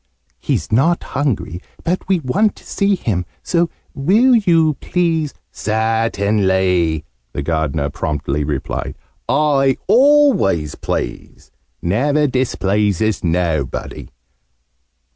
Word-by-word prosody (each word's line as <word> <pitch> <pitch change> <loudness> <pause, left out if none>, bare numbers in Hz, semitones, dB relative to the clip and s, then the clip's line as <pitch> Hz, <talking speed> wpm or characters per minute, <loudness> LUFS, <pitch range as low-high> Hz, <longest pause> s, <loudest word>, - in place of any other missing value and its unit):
"He's - - -2
not 140 +10 +2
hungry. 130 - -2 0.2
But 180 +2 -2
we 185 -3 +1
want 200 +11 +1
to - - -17
see 200 0 +1
him. 100 - -2 0.2
So 170 -1 +1 0.2
Will 215 - +4
you 165 -8 +3
please 165 -4 0 0.2
" - - -50 0.2
"Certainly!" 100 -7 +1 0.3
the 70 - -3
Gardener 80 -2 -1
promptly 75 -1 -2
replied. 75 0 -3 0.3
"I 135 -3 +2
always 245 - +4
please. - - -5 0.3
Never 140 - +2
displeases 105 - 0
nobody. 80 -5 -2
115 Hz, 100 wpm, -18 LUFS, -, 0.3 s, Will